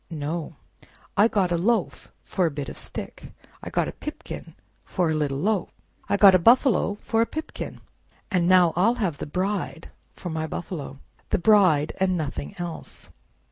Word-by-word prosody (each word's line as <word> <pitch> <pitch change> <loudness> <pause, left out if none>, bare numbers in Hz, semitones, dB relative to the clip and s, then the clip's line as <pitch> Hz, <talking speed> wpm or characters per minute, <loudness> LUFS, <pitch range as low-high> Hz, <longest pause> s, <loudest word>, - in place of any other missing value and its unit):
No! 160 +1 -4 0.6
I 205 +3 +6
got 195 -6 +1
a 170 - +2
loaf 215 +1 0
for 185 -4 0
a - - 0
bit 140 -3 -5
of - - -9
stick; - - -6 0.3
I - - -6
got - - 0
a - - -4
pipkin - - -8 0.3
for 175 -3 0
a - - +1
little 145 -3 -1
loaf; 200 +5 0 0.4
I 200 - +2
got 200 -2 +8
a 185 - +6
buffalo 230 - +4
for 225 - +1
a 230 - +2
pipkin; 315 +1 -6 0.5
and 175 -2 +2
now 180 -3 +5
I'll 210 +8 +3
have 190 -11 -2
the - - -5
Bride 185 0 -3 0.2
for 175 - -6
my 160 0 -2
buffalo—the 145 -5 -5
Bride, 175 -6 +4
and 185 -1 +2
nothing 80 - -4
else!" 175 -2 -7
180 Hz, 170 wpm, -25 LUFS, 160-200 Hz, 0.6 s, got